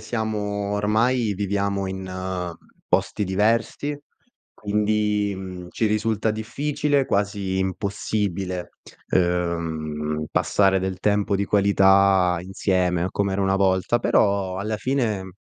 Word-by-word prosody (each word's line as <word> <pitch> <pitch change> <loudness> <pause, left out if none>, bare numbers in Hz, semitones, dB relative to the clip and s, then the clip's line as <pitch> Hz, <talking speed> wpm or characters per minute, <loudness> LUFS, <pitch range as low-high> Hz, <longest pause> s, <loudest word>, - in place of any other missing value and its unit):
siamo 105 -2 -2
ormai 110 +3 +1
viviamo 100 0 -1
in 95 -1 -4 0.3
posti 105 - +1
diversi. 115 +9 0 0.6
Quindi, 105 0 0
mhmm, 90 -2 -8
ci 110 - 0
risulta 110 +1 0
difficile, 140 +5 0
quasi 100 -4 -1
impossibile, 95 -1 -2 0.4
ehm, 80 -4 -1
passare 95 -1 +2
del 95 -1 -3
tempo 105 0 +1
di 100 +1 +1
qualità 95 -2 +4
insieme 90 -1 0
com'era 100 -1 -1
una 95 0 +2
volta, 95 +4 +2
però 100 -4 +1
alla 105 +2 -2
fine 110 -7 -1
100 Hz, 100 wpm, -23 LUFS, 95-105 Hz, 0.6 s, qualità